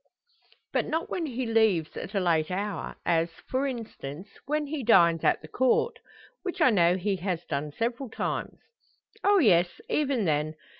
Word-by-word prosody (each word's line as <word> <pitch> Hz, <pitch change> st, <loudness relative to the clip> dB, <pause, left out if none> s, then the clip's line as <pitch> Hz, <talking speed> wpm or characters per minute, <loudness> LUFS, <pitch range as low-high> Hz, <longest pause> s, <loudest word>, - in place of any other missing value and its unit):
"But -, -, +1 dB
not 325 Hz, +2 st, -2 dB
when 335 Hz, -3 st, -2 dB
he 255 Hz, -1 st, -3 dB
leaves 220 Hz, -8 st, +2 dB
at 200 Hz, +4 st, -6 dB
a -, -, +3 dB
late 165 Hz, -4 st, +1 dB
hour 195 Hz, 0 st, -3 dB
as, 165 Hz, 0 st, +2 dB, 0.2 s
for 265 Hz, +2 st, 0 dB
instance, 205 Hz, -, -7 dB, 0.2 s
when 300 Hz, +1 st, 0 dB
he 295 Hz, 0 st, -4 dB
dines 170 Hz, -7 st, +5 dB
at -, -, +2 dB
the -, -, -9 dB
Court; 260 Hz, -, +1 dB, 0.4 s
which 365 Hz, -2 st, -5 dB
I 255 Hz, -, +5 dB
know 175 Hz, -3 st, +4 dB
he 195 Hz, +1 st, -1 dB
has 180 Hz, -2 st, -3 dB
done 145 Hz, 0 st, -3 dB
several 235 Hz, -, -3 dB
times?" -, -, -3 dB, 0.7 s
"Oh, 405 Hz, 0 st, +5 dB
yes; 175 Hz, -, +3 dB
even 270 Hz, -7 st, +1 dB
then. 155 Hz, 0 st, 0 dB
205 Hz, 165 wpm, -27 LUFS, 170-260 Hz, 0.7 s, dines